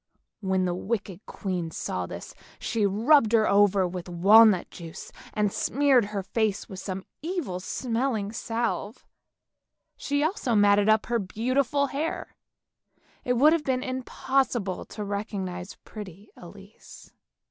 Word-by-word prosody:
When 190 -2 0
the 175 - 0
wicked 200 0 -4
queen 180 -5 -3
saw - - -4
this, - - -8 0.2
she 220 -4 0
rubbed 225 +4 +4
her 220 -2 +4
over 200 -2 +4
with 180 0 -6
walnut 200 +3 +6
juice, 165 -2 -9 0.2
and 210 -2 +1
smeared 275 -4 +3
her 200 -1 -4
face 215 0 -1
with 190 - -8
some 190 -1 -5 0.2
evil 315 - -3
smelling 230 +1 -2
salve. 225 -1 -3 0.9
She 285 +1 -1
also 310 - 0
matted 205 0 +4
up 215 0 +4
her 235 -1 0
beautiful 255 +8 0
hair; 285 +4 -4 0.9
it 250 - +1
would 290 +6 +5
have 335 -2 0
been 260 -2 0
impossible 255 -5 -1
to 210 - -7
recognise 200 -3 -4
pretty 205 -1 -10
Elise. 195 +4 -14
210 Hz, 130 wpm, -26 LUFS, 190-250 Hz, 0.9 s, walnut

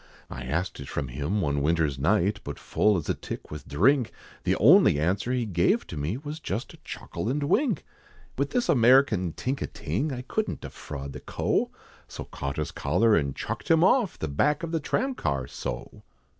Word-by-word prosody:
I 60 0 -6
asked 85 +8 -2
it 70 - -8
from 70 -3 -3
him 75 +11 -1
one 70 -4 0
winter's 75 -2 +1
night, 100 +6 +2
But 70 -1 -6
full 105 -2 +2
as 80 - -4
a - - +2
tick - - -8
with 75 - -8
drink, 125 - +3 0.3
The - - +3
only 75 - +6
answer 95 +9 0
he 125 -2 0
gave 85 -4 +2
to - - -8
me, 75 +9 -2
Was 150 +3 -6
just 110 -7 -4
a - - -14
chuckle 110 - -5
and 145 +3 0
wink. 225 - +1 0.5
With 140 +1 0
this 245 +7 0
American 120 - +4
tink 135 +2 -3
a - - -1
ting, 150 +2 -2
I 125 -1 -4
couldn't 215 +11 -2
defraud 70 -2 -7
the - - -7
Co., - - 0 0.4
So - - -7
caught 70 +1 -5
his 75 - -2
collar, 95 +10 +2
and 70 -6 0
chucked - - -5
him 165 0 +5
off 215 +1 +3
The 80 - -3
back 145 - +1
of 165 - -3
the 165 - +1
tram 265 - 0
car, 70 - -1
so. - - -6
100 Hz, 200 wpm, -27 LUFS, -, 0.5 s, only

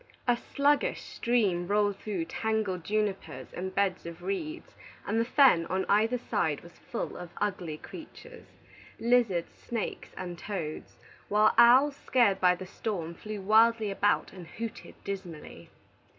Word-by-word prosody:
A 245 - +5
sluggish 280 +4 +1
stream 205 -8 0
rolled 205 0 +2
through 195 -6 -3
tangled 205 -1 -2
junipers 195 -10 -2
and 190 +1 -5
beds 190 -3 0
of 170 +1 -9
reeds, 305 - -4 0.3
and 220 +2 0
the - - 0
fen 245 - +5
on 190 +1 -1
either 220 +4 +3
side 185 - -1
was 170 - -16
full - - -3
of 180 -1 -8
ugly 185 -6 -2
creatures, 475 - -12 0.5
lizards, 230 -8 +2
snakes, 230 -4 -5
and 175 -2 -6
toads; 175 -7 -5 0.3
while 210 +1 +4
owls, 260 +4 +6
scared 220 -7 +2
by 180 -1 +5
the 185 - -8
storm, 180 -4 -4
flew 210 +4 -7
wildly 220 +1 +4
about 205 +1 +1
and 180 -3 -10
hooted 230 +3 -7
dismally. 190 -5 -7
205 Hz, 140 wpm, -29 LUFS, 180-230 Hz, 0.5 s, owls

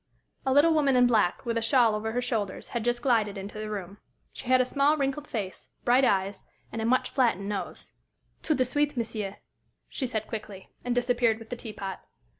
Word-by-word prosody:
A - - +3
little 295 +5 +5
woman 285 -4 +3
in 250 0 +6
black, 220 -3 +2
with 230 -1 0
a - - -5
shawl 230 -1 +4
over 220 +1 -2
her 245 +1 0
shoulders, 210 -6 -2
had 235 -2 -2
just 240 +1 0
glided 220 -6 +2
into 200 +2 -7
the 215 0 -4
room. 200 -1 -6 0.3
She 255 - -10
had 255 0 +5
a 255 - +4
small, 280 +4 +2
wrinkled 280 +1 -1
face, 200 -5 -5 0.2
bright 250 +2 +5
eyes, 195 -3 +1 0.3
and 225 - -4
a - - -1
much 255 +2 +2
flattened 230 -7 +1
nose. 195 -4 -5 0.5
"Tout 310 - 0
de 255 - +3
suite, 290 +2 0
monsieur," 215 -4 -3 0.5
she 260 - -3
said, 220 -3 -2
quickly, 210 -4 -7
and 245 0 -1
disappeared 245 -2 +2
with 225 +1 -13
the - - -1
teapot. 210 -5 -6
235 Hz, 205 wpm, -28 LUFS, 210-255 Hz, 0.5 s, in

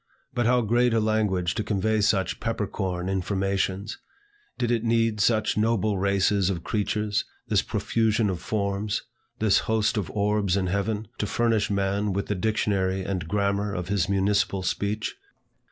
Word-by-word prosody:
But 120 -1 +1
how 125 0 +4
great 120 +2 +2
a - - +4
language 105 -5 +1
to 110 - -2
convey 105 +1 0
such 100 -3 +1
pepper - - -1
corn 90 -1 -3
informations! 95 +1 -1 0.6
Did 120 -1 0
it 115 -2 +1
need 115 -2 +1
such 110 -1 +2
noble 110 -2 +1
races 100 0 +2
of 85 -4 -3
creatures, 105 -1 -1 0.3
this - - +3
profusion 110 -1 +1
of 90 -3 -2
forms, 100 0 -1 0.3
this 110 -2 +3
host 110 +1 +2
of 100 -5 -2
orbs 105 -2 +1
in 95 - 0
heaven, 100 +3 -1
to 105 - 0
furnish 115 -2 +1
man 100 0 0
with 100 +2 -1
the - - -1
dictionary 95 -2 0
and 95 -4 -3
grammar 100 +1 0
of 90 +1 -4
his 100 -1 +1
municipal 100 0 +1
speech? 100 - -2
100 Hz, 155 wpm, -26 LUFS, 95-110 Hz, 0.6 s, how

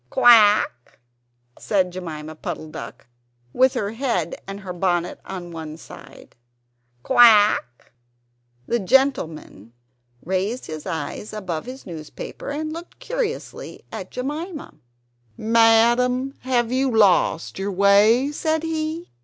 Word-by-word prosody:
"Quack?" 215 - +4 0.6
said 185 -3 0
Jemima 160 -4 -7
Puddle 155 0 -6
duck, 160 +1 -9 0.5
with 260 0 +3
her 200 0 -2
head 225 - -2
and 195 +1 -7
her 185 -2 -6
bonnet 175 -1 -1
on 180 -2 -7
the - - -11
one 160 -1 -7
side - - -14 0.7
"Quack?" 215 - +4 0.7
The 235 - 0
gentleman 180 - 0 0.5
raised 190 +7 -2
his 155 -1 -7
eyes 160 +6 -5
above 185 -6 -4
his 260 +1 -9
newspaper 160 -4 -8
and 310 +2 -4
looked 335 +2 -10
curiously - - -5
at - - -7
Jemima 300 +5 -5 0.6
"Madam, 235 +4 +3
have 245 -2 0
you 265 +1 +1
lost 195 -7 +2
your 200 +1 -2
way?" 205 +7 +4
said 315 +1 -1
he. 320 +1 -4
215 Hz, 115 wpm, -22 LUFS, 175-260 Hz, 0.7 s, Quack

